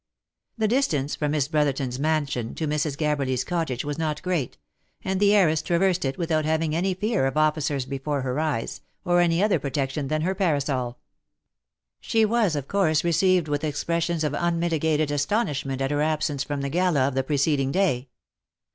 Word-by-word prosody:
The 220 -1 +1
distance 170 - 0
from 150 -1 -1
Miss 145 -3 +1
Brotherton's 140 -4 0
man 155 0 +1
sion 120 -5 -4
to 160 - -2
Mrs. 150 -1 -1
Gabberly's 140 -5 0
cottage 160 -8 -2
was 145 +1 -4
not 155 -2 -1
great, 170 - -2 0.5
and 190 0 -1
the 205 0 +4
heiress 160 -6 +3
traversed 180 0 +1
it 135 0 -2
without 160 -3 0
having 160 0 0
any 185 +2 0
fear 205 - 0
of 135 - -3
officers 150 -3 +1
before 140 +1 -3
her 130 +2 -2
eyes, 155 -7 -2 0.2
or 175 0 +3
any 170 +2 +2
other 205 -6 +2
pro 140 - -4
tection 135 0 -2
than 155 0 0
her 185 +3 0
parasol. 140 - -1 1.0
She 225 -1 +2
was, 215 -6 +1
of 140 -2 -4
course, 160 -6 +2
received 175 0 +2
with 145 0 -2
expressions 170 +2 -1
of 150 -2 -1
unmitigated 160 -2 0
asto 145 +11 +1
nishment 135 -4 -4
at 135 +1 0
her 145 0 0
absence 155 -2 0
from 145 0 -4
the 140 - -2
gala 165 -4 +2
of 140 - -2
the 135 - +1
preceding 140 -1 +1
day. 140 -9 +1
155 Hz, 180 wpm, -25 LUFS, 140-170 Hz, 1.0 s, the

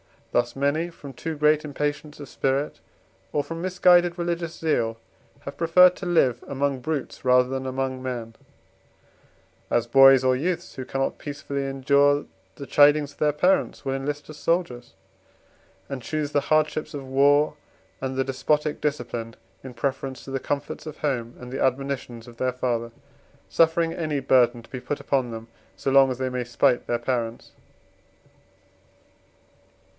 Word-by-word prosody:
Thus 120 0 0
many 145 +5 0
from 145 -5 -11
too 160 +5 -5
great 150 +1 +3
impatience 150 +1 -3
of 145 - -8
spirit, 135 +3 -1 0.5
or 145 - +1
from 165 +2 -6
misguided 180 -1 +4
religious 170 -1 -3
zeal, 115 -8 0 0.4
have 140 - -8
preferred 180 +2 +6
to - - -7
live 130 -9 +2
among 140 -1 -1
brutes 150 +1 -4
rather 125 0 +4
than 130 0 -3
among 130 0 -3
men; 120 -3 -5 1.3
as 120 - +1
boys 135 +1 +7
or 130 0 +3
youths, 170 +6 -2
who 130 - -6
cannot 135 +1 -2
peaceably 140 -1 -4
endure 140 +2 +2 0.3
the 140 - -8
chidings 145 +1 +4
of - - -22
their 150 -1 +2
parents, 180 0 +1
will 135 - -1
enlist 145 +2 -4
as 155 - -9
soldiers 145 -7 -1 1.0
and 135 -2 -5
choose 150 +3 -3
the 145 - +2
hardships 155 0 +1
of 140 -2 -6
war 145 +3 +3 0.4
and 130 0 -3
the 135 - +1
despotic 150 +3 0
discipline 120 -6 -3 0.3
in 130 -1 -8
preference 135 +2 -3
to 135 - -9
the 135 - -1
comforts 145 +4 -4
of 155 - -8
home 125 -5 -2
and 125 0 -9
the 135 - -4
admonitions 130 -3 -2
of 120 -1 -13
their 130 0 0
father: 120 -2 -2 0.6
suffering 165 0 +2
any 155 -4 -2
burden 120 -2 +3
to - - -19
be 130 - -5
put 145 - -4
upon 130 -3 0
them, 115 0 -7 0.3
so 135 - -2
long 135 0 +6
as 130 - -3
they 130 0 -2
may 125 -1 -3
spite 120 0 +1
their 120 - +1
parents. 120 -1 -3
135 Hz, 160 wpm, -24 LUFS, 130-150 Hz, 1.3 s, boys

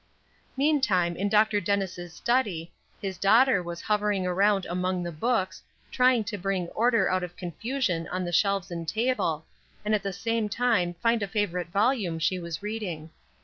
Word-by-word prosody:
Meantime, 260 - +2
in 200 +3 -1
Dr. 210 0 +3
Dennis' 185 -2 -2
study, 190 -5 -1 0.3
his 190 -2 -5
daughter 225 +1 +5
was 170 -1 -6
hovering 210 -2 0
around 195 +2 +2
among 180 +1 -1
the 175 - -4
books, 190 +1 -1 0.3
trying 250 -2 +4
to 205 -1 -5
bring 185 -2 -1
order 235 +1 +2
out 185 0 +1
of 175 -1 -6
confusion 180 - -2
on 185 0 -3
the 175 - -3
shelves 195 0 +1
and 170 -1 -5
table, 215 -8 0 0.4
and 215 - +1
at 210 - +2
the 195 0 -3
same 225 +2 -1
time 220 -7 +1
find 230 +5 +1
a 200 - -1
favorite 190 -4 -1
volume 200 -2 +1
she 175 +3 0
was 170 +2 -6
reading. 185 -8 -4
195 Hz, 165 wpm, -27 LUFS, 175-220 Hz, 0.4 s, daughter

